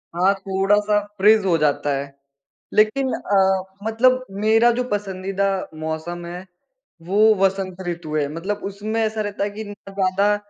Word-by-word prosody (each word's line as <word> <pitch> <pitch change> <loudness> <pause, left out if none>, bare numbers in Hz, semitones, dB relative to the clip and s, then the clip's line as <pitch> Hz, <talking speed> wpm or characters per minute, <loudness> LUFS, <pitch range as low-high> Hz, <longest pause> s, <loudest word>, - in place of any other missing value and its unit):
हाँ, 185 +3 +3
थोड़ा-सा 205 +2 +2 0.2
फ्रीज़ 210 +1 +5
हो 170 -3 +3
जाता 145 -1 +1
है। 140 0 -6 0.6
लेकिन 255 +5 +2
अ, 190 -1 +2 0.2
मतलब 255 +4 +2 0.2
मेरा 225 +2 +5
जो - - +1
पसंदीदा 195 -1 -2 0.3
मौसम 160 +2 -4
है, 180 +2 -7 0.6
वो 205 +6 +4
वसंत 190 -1 -2
ऋतु 170 -3 -4
है 145 -2 +1
मतलब 190 +6 -4
उसमें 210 +3 -3
ऐसा 220 0 -1
रहता 205 -1 -3
है - - -2
कि 215 +2 -7
ना 205 -1 -11
ज़्यादा 195 +2 +2
195 Hz, 150 wpm, -21 LUFS, 180-215 Hz, 0.6 s, फ्रीज़